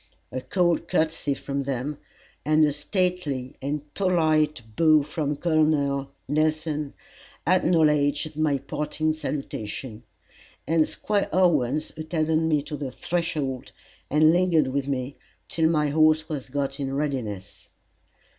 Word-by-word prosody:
A 130 - -3
cold 175 +6 +1
courtesy 155 -3 0
from 140 0 -3
them, 140 +2 -3 0.4
and 155 +1 +4
a 145 - +1
stately 150 -4 -1
and 145 +1 -4
polite 155 -7 +2
bow 155 -3 +5
from 150 0 -2
Col. 145 -3 +1 0.2
Nelson, 155 0 0 0.5
acknowledged 155 -4 +2
my 155 -2 +1
parting 150 +3 -2
salutation, 130 -6 -5 0.6
and 160 -1 +2
Squire 205 -1 -1
Owens 155 -6 +2
attended 155 0 0
me 160 -3 +1
to 150 +1 -6
the 145 -2 -4
threshold, 145 -5 -3 0.4
and 155 +2 +5
lingered 170 -6 +3
with 140 +1 -2
me 135 0 -3 0.3
till 160 -1 +1
my 150 -2 +2
horse 155 +1 +3
was 145 -4 -5
got 140 +1 -2
in 135 -1 -2
readiness. 125 -10 -4
150 Hz, 120 wpm, -25 LUFS, 140-160 Hz, 0.6 s, bow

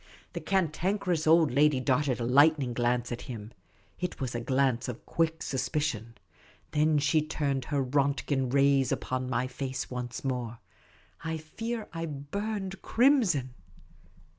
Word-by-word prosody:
The - - -4
Cantankerous 180 -1 0
Old 160 -1 +5
Lady 145 +1 +4
darted 130 0 +1
a - - -2
lightning 140 0 +4
glance 120 0 0
at 120 - -4
him. 110 -3 -7 0.5
It 180 -1 -3
was 130 -3 -3
a 120 - -2
glance 130 0 +1
of 125 -2 -7
quick 165 -1 0
suspicion. 130 -4 -2 0.6
Then 155 0 +3
she 150 +2 +3
turned 140 -4 -2
her 145 -2 0
Rontgen 135 -1 0
rays 140 -1 +3
upon 130 0 -2
my 125 0 0
face 130 0 -4
once 125 -1 -5
more. 125 -3 -2 0.7
I 160 -1 -2
fear 225 +8 -5
I 165 -1 -3
burned 195 +7 -4
crimson. 220 - +3
140 Hz, 140 wpm, -29 LUFS, 125-160 Hz, 0.7 s, Old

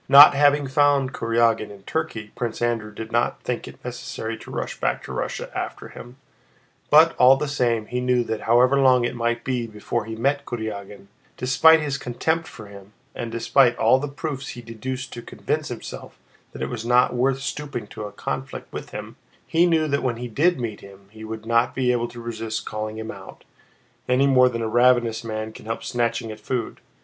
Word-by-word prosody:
Not 140 +2 +10
having 145 0 +4
found 140 -1 +2
Kurágin 115 -2 +1
in 100 -1 -13
Turkey, 110 -10 -4
Prince 120 -2 -3
Andrew 115 -3 -1
did 110 +2 -8
not 120 +1 +1
think 125 -1 -3
it - - -13
necessary 120 -2 -5
to - - -12
rush - - -4
back - - -1
to - - -7
Russia - - -4
after - - -5
him, 120 +2 -12 0.7
but 160 +2 +6
all 130 +2 +7
the 150 +1 -2
same 120 -6 0
he 125 +3 -3
knew 125 -1 +2
that 110 -2 -4
however 125 +4 +5
long 130 -2 +5
it 120 - -2
might 120 0 -1
be 125 -3 -2
before 110 +1 -3
he 110 0 -6
met 140 +5 0
Kurágin, 105 -4 -6 0.3
despite 160 +5 +5
his 140 -2 -2
contempt 160 +7 -1
for 110 - -11
him 100 0 -13 0.2
and 115 -1 -5
despite 120 +2 +3
all 130 - +4
the 145 - -3
proofs 140 -1 -5
he 120 - -8
deduced 125 +3 -6
to 120 - -7
convince - - -3
himself - - -8 0.3
that - - -6
it - - -1
was 120 -3 -5
not 125 +2 +3
worth 130 +2 +1
stooping 135 -4 -4
to 105 - -8
a 105 - -7
conflict 135 +5 -6
with - - -6
him—he 170 +2 -2
knew 160 -2 +2
that 140 -1 0
when 125 -2 -1
he 125 +1 -5
did 150 +8 +2
meet 115 -4 -4
him 100 0 -15
he 110 0 -11
would 110 0 -7
not 115 +1 +2
be 125 -2 +2
able 120 -1 0
to 120 - -11
resist 115 -1 -4
calling 110 0 -4
him 110 0 -5
out, - - -12 0.7
any 130 +2 +4
more 130 -2 +5
than 115 -2 -3
a - - -1
ravenous 120 -1 +3
man 110 -1 -4
can - - -12
help 115 - -3
snatching 115 -1 -1
at 110 - -9
food. 120 +1 -3
120 Hz, 200 wpm, -23 LUFS, 110-135 Hz, 0.7 s, Not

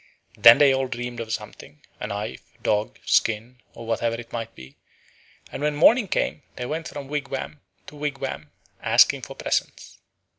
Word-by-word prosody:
Then 115 +2 +9
they 140 -2 +6
all 135 0 0
dreamed 120 -1 -5
of 115 -1 -5
something, 75 -7 -7 0.2
a - - -4
knife, 105 +2 -5 0.2
dog, 105 0 0
skin, 115 +3 +1
or 115 - -9
whatever 115 0 0
it 120 - -11
might 115 -1 -5
be, 65 +2 -13 0.8
and - - -6
when 150 0 0
morning 225 - +5
came 155 - -1
they 125 - -5
went 160 +5 -4
from 140 -2 -7
wigwam 140 0 -4 0.2
to - - -12
wigwam 145 -1 -4 0.3
asking - - +4
for - - -9
presents. - - -3
125 Hz, 160 wpm, -24 LUFS, 115-145 Hz, 0.8 s, Then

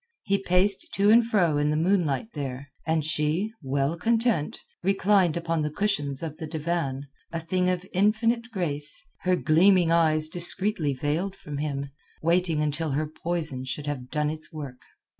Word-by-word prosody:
He 200 0 +1
paced 190 +2 +2
to 200 +2 +4
and 235 +2 +7
fro 185 -9 +2
in 145 0 +1
the 150 - +1
moonlight 170 - +1
there, 135 -2 -5 0.2
and 160 -2 +1
she, 155 +7 0
well 140 +2 0
content, 225 -3 +1 0.2
reclined 195 -2 +2
upon 165 -1 -1
the 150 - -1
cushions 150 -6 -1
of 155 -2 -5
the 160 -2 -6
divan, 155 -3 -2 0.3
a 165 - -2
thing 180 +3 0
of 180 0 -1
infinite 225 +5 +2
grace, 150 -7 +1
her 185 0 +2
gleaming 175 +1 +4
eyes 155 -2 +3
discreetly 175 -2 0
veiled 160 +9 -2
from 145 -1 -7
him—waiting 150 +4 -1
until 150 0 -1
her 155 +3 0
poison 155 -4 -4
should 135 +3 -3
have 135 -4 -4
done 150 -1 0
its 155 0 -6
work. 140 -5 -8
160 Hz, 160 wpm, -26 LUFS, 150-185 Hz, 0.3 s, and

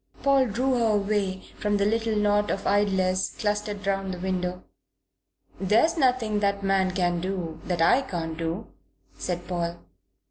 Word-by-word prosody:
Paul 275 -2 +4
drew 250 +5 0
her 225 -2 +3
away 200 -2 -1 0.2
from 205 -1 +1
the 200 - +1
little 225 +1 +1
knot 210 0 +2
of 195 - -2
idlers 190 -2 +1
clustered 210 -1 -2
round 195 -1 -1
the 180 - -5
window. 180 -1 -2 1.0
"There's 225 - +3
nothing 250 -8 +2
that 200 -1 0
man 195 -1 +2
can 175 -2 0
do 175 -4 -4
that 175 -2 +1
I 255 - +5
can't 165 -9 -4
do," 165 +6 -3 0.5
said 175 -1 -4
Paul. 170 -1 -2
195 Hz, 150 wpm, -26 LUFS, 180-210 Hz, 1.0 s, I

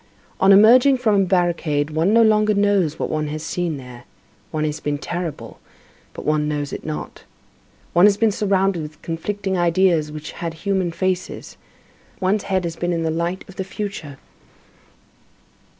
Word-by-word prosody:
On 190 +1 +5
emerging 245 +7 +7
from 225 -4 +2
a - - +2
barricade, 170 -5 0
one 160 +5 +1
no 230 +1 +5
longer 215 -1 +3
knows 200 -6 +2
what - - -3
one 155 -1 -1
has 155 +1 -5
seen 170 -1 -2
there. 125 -2 -11 0.4
One 155 -1 -2
has 150 0 -2
been 145 0 -2
terrible, 170 +1 -6 0.5
but - - -9
one 150 0 +1
knows 145 -1 -3
it - - -6
not. 155 -1 -6 0.7
One 175 +4 +7
has 200 -1 +2
been 225 -1 +3
surrounded 195 -3 +1
with 150 0 -9
conflicting 190 +3 -3
ideas 170 -3 +2
which 155 0 -7
had 165 -1 -5
human 190 0 -1
faces; 185 +1 -3 0.6
one's 195 +2 0
head 190 -1 +1
has 170 -1 -4
been 175 +1 -2
in 165 -1 -1
the 160 - 0
light 170 +3 -3
of 190 - -14
the 190 - -2
future. 185 -7 -6
175 Hz, 165 wpm, -21 LUFS, 155-195 Hz, 0.7 s, emerging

